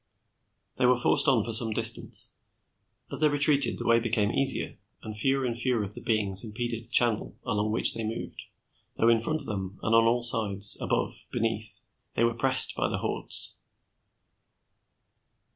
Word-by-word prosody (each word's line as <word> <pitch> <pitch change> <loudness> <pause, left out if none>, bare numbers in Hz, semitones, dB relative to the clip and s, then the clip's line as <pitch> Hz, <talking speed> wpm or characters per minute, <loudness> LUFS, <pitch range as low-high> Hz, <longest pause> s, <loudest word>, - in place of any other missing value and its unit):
They 125 - +1
were 125 0 +2
forced 120 - +2
on 125 -6 +2
for 115 - -5
some 110 0 +7
distance. 115 +1 +1 0.8
As - - -2
they 155 -1 +2
retreated, 145 -2 +2
the - - -6
way 115 0 +2
become 110 -3 -2
easier, 135 +1 0 0.2
and 110 -1 -9
fewer 135 +5 -1
and 120 -2 -4
fewer 120 -2 -2
of 100 0 -7
the - - -7
beings 100 -4 +3
impeded 115 +1 -6
the - - -26
channel 120 -3 0
along 105 +1 -3
which 110 - +5
they 115 - -5
moved, 110 +1 -8 0.5
though 115 - +1
in 115 -1 +2
front 155 +7 -4
of - - -9
them 95 -3 -7
and 110 - -2
on 115 0 +3
all 120 +1 0
sides, 105 -4 +4
above, - - -4
beneath, 110 -2 -4 0.3
they 115 - 0
were 115 0 0
pressed 130 +3 +3
by - - -2
the - - -4
hordes. - - -4
115 Hz, 175 wpm, -25 LUFS, 110-120 Hz, 0.8 s, some